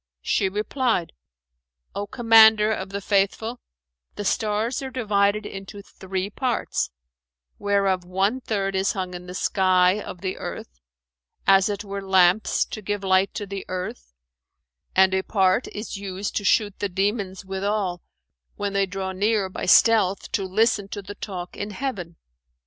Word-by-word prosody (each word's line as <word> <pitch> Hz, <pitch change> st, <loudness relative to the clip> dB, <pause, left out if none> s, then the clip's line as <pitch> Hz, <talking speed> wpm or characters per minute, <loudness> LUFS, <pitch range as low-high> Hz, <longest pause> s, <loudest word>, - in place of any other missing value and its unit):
She 195 Hz, -, +1 dB
replied: 215 Hz, -1 st, -1 dB, 0.8 s
"O 200 Hz, 0 st, -4 dB
Commander 220 Hz, -2 st, +6 dB
of 190 Hz, -2 st, -3 dB
the 200 Hz, +1 st, -4 dB
Faithful, 205 Hz, +4 st, 0 dB, 0.6 s
the 205 Hz, -, -5 dB
stars 215 Hz, +5 st, 0 dB
are 265 Hz, -, -4 dB
divided 210 Hz, -4 st, +1 dB
into 195 Hz, +1 st, -8 dB
three 190 Hz, +1 st, -5 dB
parts, 250 Hz, +1 st, -1 dB, 0.7 s
whereof 195 Hz, -2 st, +1 dB
one 195 Hz, +8 st, 0 dB
third 195 Hz, -4 st, -2 dB
is 190 Hz, +1 st, +1 dB
hung 185 Hz, -2 st, -4 dB
in 180 Hz, 0 st, -8 dB
the 180 Hz, -, -7 dB
sky 185 Hz, +1 st, +3 dB
of 180 Hz, -, -8 dB
the 190 Hz, -1 st, -3 dB
earth,[FN#427] 60 Hz, 0 st, -7 dB, 0.7 s
as 195 Hz, +1 st, +5 dB
it 205 Hz, 0 st, -3 dB
were 200 Hz, -1 st, -5 dB
lamps, 190 Hz, +1 st, +3 dB
to 215 Hz, -, -7 dB
give 205 Hz, 0 st, -3 dB
light 190 Hz, 0 st, +3 dB
to 205 Hz, -, -3 dB
the 195 Hz, -1 st, -6 dB
earth, 180 Hz, -, -5 dB, 0.8 s
and 190 Hz, 0 st, +5 dB
a 190 Hz, -, +2 dB
part 190 Hz, +3 st, +2 dB
is 210 Hz, 0 st, -6 dB
used 195 Hz, 0 st, -5 dB
to 205 Hz, -, -2 dB
shoot 205 Hz, 0 st, +2 dB
the 205 Hz, -, -1 dB
demons 195 Hz, 0 st, -2 dB
withal, 190 Hz, -2 st, -2 dB, 0.5 s
when 205 Hz, -1 st, -3 dB
they 195 Hz, 0 st, +2 dB
draw 190 Hz, 0 st, -4 dB
near 200 Hz, +1 st, +1 dB
by -, -, -5 dB
stealth 200 Hz, -2 st, +4 dB
to 195 Hz, -, -1 dB
listen 205 Hz, +1 st, +1 dB
to 200 Hz, 0 st, -7 dB
the 200 Hz, +2 st, -7 dB
talk 180 Hz, -4 st, -7 dB
in 205 Hz, -, -4 dB
heaven. 200 Hz, -7 st, -5 dB
200 Hz, 155 wpm, -24 LUFS, 190-210 Hz, 0.8 s, Commander